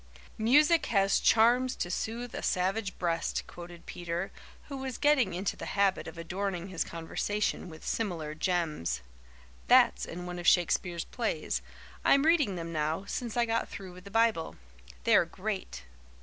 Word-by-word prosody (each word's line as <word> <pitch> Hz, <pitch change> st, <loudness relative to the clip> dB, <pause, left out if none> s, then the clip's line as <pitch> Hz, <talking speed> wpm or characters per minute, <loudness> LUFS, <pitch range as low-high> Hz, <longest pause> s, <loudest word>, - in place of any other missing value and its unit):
"'Music 295 Hz, +9 st, +5 dB
has 195 Hz, -3 st, +3 dB
charms 245 Hz, +3 st, +4 dB
to 175 Hz, -, -3 dB
soothe 235 Hz, +5 st, -3 dB
a -, -, -4 dB
savage 190 Hz, +2 st, 0 dB
breast,'" 170 Hz, -2 st, -1 dB
quoted 175 Hz, -1 st, -11 dB
Peter, 175 Hz, +2 st, -4 dB, 0.3 s
who 275 Hz, -, -7 dB
was 265 Hz, -2 st, -4 dB
getting 265 Hz, -, +3 dB
into 190 Hz, +3 st, -2 dB
the -, -, -7 dB
habit 200 Hz, -1 st, +2 dB
of 160 Hz, -, -9 dB
adorning 180 Hz, +2 st, -3 dB
his 180 Hz, -3 st, -1 dB
conversation 180 Hz, +4 st, -2 dB
with 160 Hz, -1 st, -11 dB
similar 170 Hz, -9 st, -2 dB
gems. 160 Hz, -, -1 dB, 0.7 s
"That's -, -, +5 dB
in 180 Hz, +1 st, -7 dB
one 180 Hz, 0 st, -5 dB
of 175 Hz, -, -3 dB
Shakespeare's 175 Hz, -1 st, +2 dB
plays. -, -, -2 dB, 0.4 s
I'm 280 Hz, +1 st, +5 dB
reading 305 Hz, -, +3 dB
them 165 Hz, -1 st, -5 dB
now, 155 Hz, +4 st, -1 dB
since 240 Hz, +1 st, -4 dB
I 240 Hz, -, +4 dB
got 230 Hz, 0 st, -1 dB
through 190 Hz, -3 st, -8 dB
with 180 Hz, +1 st, -13 dB
the -, -, -8 dB
Bible. 225 Hz, -6 st, +1 dB, 0.5 s
They're -, -, +5 dB
great." 65 Hz, +1 st, -5 dB
190 Hz, 155 wpm, -30 LUFS, 170-225 Hz, 0.7 s, Music